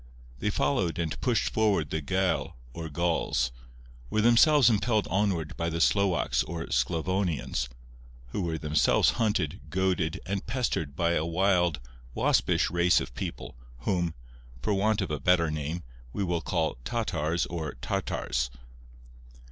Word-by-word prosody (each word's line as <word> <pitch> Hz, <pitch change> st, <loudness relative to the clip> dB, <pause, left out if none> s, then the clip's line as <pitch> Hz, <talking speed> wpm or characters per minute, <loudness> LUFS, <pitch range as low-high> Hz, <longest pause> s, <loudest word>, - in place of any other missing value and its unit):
They -, -, 0 dB
followed 80 Hz, +5 st, 0 dB
and 85 Hz, -3 st, -3 dB
pushed 125 Hz, -3 st, +1 dB
forward 100 Hz, -9 st, +2 dB
the 80 Hz, -, -1 dB
Gael 95 Hz, +3 st, 0 dB, 0.2 s
or 80 Hz, +2 st, -6 dB
Gauls; 80 Hz, -6 st, 0 dB, 0.6 s
were 110 Hz, -, 0 dB
themselves 125 Hz, +5 st, +6 dB
impelled 110 Hz, -1 st, +2 dB
onward 90 Hz, -6 st, 0 dB
by 85 Hz, 0 st, -1 dB
the 85 Hz, 0 st, -3 dB
Slowaks 90 Hz, -9 st, +2 dB
or 80 Hz, +5 st, -4 dB
Sclavonians, 85 Hz, -7 st, 0 dB, 0.6 s
who 100 Hz, -, -3 dB
were 85 Hz, -2 st, -1 dB
themselves 75 Hz, -1 st, +3 dB
hunted, 100 Hz, -5 st, 0 dB
goaded, 90 Hz, -4 st, 0 dB
and 100 Hz, +1 st, -2 dB
pestered 115 Hz, -, -1 dB
by 85 Hz, +1 st, +1 dB
a 85 Hz, -, +1 dB
wild, 90 Hz, -1 st, +2 dB, 0.4 s
waspish -, -, +2 dB
race 85 Hz, 0 st, +4 dB
of -, -, -6 dB
people, -, -, -6 dB, 0.3 s
whom, 85 Hz, +2 st, 0 dB, 0.5 s
for 105 Hz, -, +1 dB
want 105 Hz, +2 st, +2 dB
of 95 Hz, -, -3 dB
a 75 Hz, -, -2 dB
better 85 Hz, -2 st, +3 dB
name, 75 Hz, +3 st, -3 dB, 0.3 s
we 100 Hz, -, -1 dB
will 85 Hz, -3 st, -1 dB
call 80 Hz, -6 st, -1 dB
Tatars 85 Hz, -, -1 dB
or 80 Hz, -5 st, -5 dB
Tartars. -, -, -2 dB
85 Hz, 140 wpm, -28 LUFS, 80-100 Hz, 0.6 s, themselves